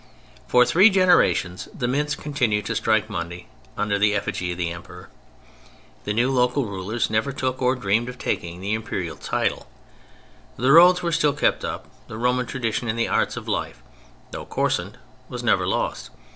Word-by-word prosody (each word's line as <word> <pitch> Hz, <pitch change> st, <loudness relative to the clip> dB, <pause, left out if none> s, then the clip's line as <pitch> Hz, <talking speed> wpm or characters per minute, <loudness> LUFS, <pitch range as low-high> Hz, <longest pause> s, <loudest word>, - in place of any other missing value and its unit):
For 125 Hz, 0 st, +5 dB
three 190 Hz, -, +6 dB
generations 180 Hz, -, +2 dB
the 120 Hz, -, -1 dB
mints 150 Hz, +4 st, 0 dB
continued 125 Hz, -9 st, -1 dB
to -, -, -3 dB
strike 110 Hz, -1 st, +1 dB
money 85 Hz, -3 st, -6 dB, 0.3 s
under 100 Hz, -1 st, 0 dB
the 105 Hz, 0 st, +3 dB
effigy 90 Hz, -3 st, -2 dB
of 85 Hz, -, -5 dB
the 85 Hz, -2 st, -2 dB
Emperor. 90 Hz, +1 st, -11 dB, 1.0 s
The 105 Hz, -, -1 dB
new 120 Hz, +4 st, +1 dB
local 125 Hz, +1 st, +1 dB
rulers 100 Hz, +3 st, -3 dB
never 110 Hz, +6 st, 0 dB
took, 130 Hz, -1 st, -3 dB
or 130 Hz, +1 st, +2 dB
dreamed 115 Hz, +1 st, 0 dB
of 125 Hz, -, -9 dB
taking, 85 Hz, -6 st, -3 dB
the 100 Hz, +3 st, -2 dB
Imperial 100 Hz, -6 st, -4 dB
title; -, -, -2 dB, 0.9 s
the 130 Hz, +3 st, +2 dB
roads 180 Hz, +3 st, +7 dB
were 170 Hz, -, 0 dB
still 150 Hz, -3 st, +2 dB
kept 150 Hz, -, +1 dB
up, -, -, -5 dB, 0.2 s
the 110 Hz, -, -8 dB
Roman 125 Hz, +1 st, 0 dB
tradition 120 Hz, -2 st, -2 dB
in 110 Hz, -, -1 dB
the 115 Hz, 0 st, 0 dB
arts -, -, 0 dB
of -, -, -7 dB
life, -, -, -3 dB, 0.5 s
though -, -, -6 dB
coarsened, -, -, -1 dB, 0.3 s
was -, -, -6 dB
never -, -, +2 dB
lost. -, -, -2 dB
115 Hz, 170 wpm, -23 LUFS, 100-130 Hz, 1.0 s, roads